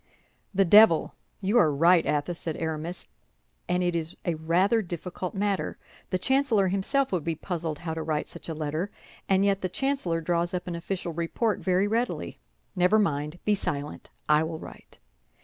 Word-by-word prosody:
"The 195 -1 +3
devil! 205 -2 +6 0.3
You 205 +5 +3
are 155 - +4
right, 165 +4 +5
Athos," 150 +3 -1
said 160 -2 -3
Aramis; 160 +2 -3 0.6
"and 180 0 +1
it 175 -1 0
is 165 +1 -3
a 175 - +1
rather 175 +8 +2
difficult 180 0 -5
matter. 200 0 -1 0.3
The 185 - +1
chancellor 235 -3 +2
himself 255 +9 +1
would 180 -5 -1
be 165 +1 -1
puzzled 165 -2 -4
how 160 0 -4
to 160 - -4
write 155 -1 -2
such - - -9
a 160 - -3
letter, 155 +5 -2 0.4
and 195 0 +4
yet 200 -1 +2
the 185 - -1
chancellor 265 -8 -1
draws 170 +2 0
up 180 - -3
an 180 - -4
official 170 0 -4
report 170 +7 -1
very 185 +1 +2
readily. 230 +4 -2 0.4
Never 180 +3 +4
mind! 150 -5 0
Be 210 - +3
silent, 145 -7 -4 0.2
I 150 0 +5
will 160 0 -3
write." - - -12
175 Hz, 175 wpm, -27 LUFS, 160-195 Hz, 0.6 s, devil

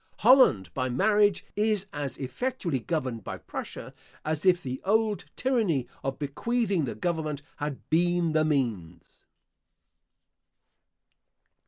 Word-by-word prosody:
Holland, 225 - +5
by 130 -1 -1
marriage, 205 - +3
is 210 -2 +1
as 140 -3 -4
effectually 170 - -2
governed 130 - -3
by - - -5
Prussia, - - -7 0.3
as 155 +3 -1
if 180 -1 +4
the 130 0 -4
old 215 +1 +1
tyranny 215 - +1 0.2
of 135 -1 -2
bequeathing 195 - 0
the - - -4
government 155 -5 -2
had 145 -2 -5
been 175 0 +2
the 155 0 +3
means. 110 - -2
160 Hz, 115 wpm, -28 LUFS, 135-205 Hz, 0.3 s, Holland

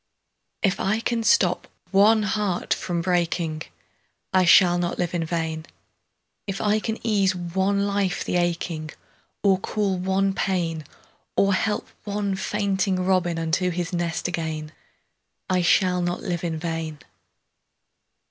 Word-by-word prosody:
VI. - - +5
If 190 - -4
I 210 +3 +1
can 230 0 -1
stop 225 - +3 0.2
one 210 +2 +5
heart 210 -3 0
from 175 -2 -2
breaking, 170 -2 0 0.7
I 185 -1 +4
shall 175 0 +6
not 175 -1 -1
live 175 -1 -1
in 170 -2 0
vain; 160 -1 -3 0.8
If 195 -1 -3
I 215 0 +2
can 220 +1 -3
ease 200 -4 +2
one 190 +3 0
life 200 -2 0
the - - -1
aching, 170 -2 -1 0.5
Or 195 -2 +4
cool 195 -2 -1
one 190 +1 +1
pain, 170 -5 -1 0.5
Or 195 0 +3
help 210 +3 0 0.2
one 205 -1 -2
fainting 195 -1 0
robin 180 -3 +1
Unto 165 +3 0
his 175 0 -3
nest 170 -1 -1
again, 160 -3 -3 0.8
I 185 -1 +3
shall 180 +1 +3
not 175 0 -2
live 175 -4 -3
in 165 -2 -2
vain. 160 -1 -4
180 Hz, 140 wpm, -24 LUFS, 170-200 Hz, 0.8 s, shall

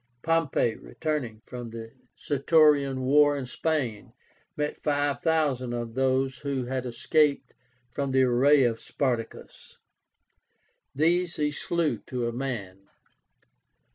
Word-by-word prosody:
Pompey, 165 -8 +1
returning 130 -9 -4
from 120 -1 -7
the 115 0 -8 0.3
Sertorian 145 -2 +3
war 145 +2 +4
in 135 - -4
Spain, 125 -5 -3 0.4
met 150 0 -3
five 145 -3 0
thousand 140 -7 0
of 120 -1 -4
those 130 +1 0
who 140 -3 -3
had 130 0 -3
escaped 145 +4 +1 0.4
from 140 +2 -2
the 130 0 +3
array 130 +3 +4
of 115 -2 0
Spartacus. 125 -5 -4 1.2
These 170 +4 +1
he 150 -1 0
slew 170 +1 -1
to 125 -3 -2
a 120 - -3
man. 100 -7 -5
135 Hz, 115 wpm, -27 LUFS, 120-150 Hz, 1.2 s, war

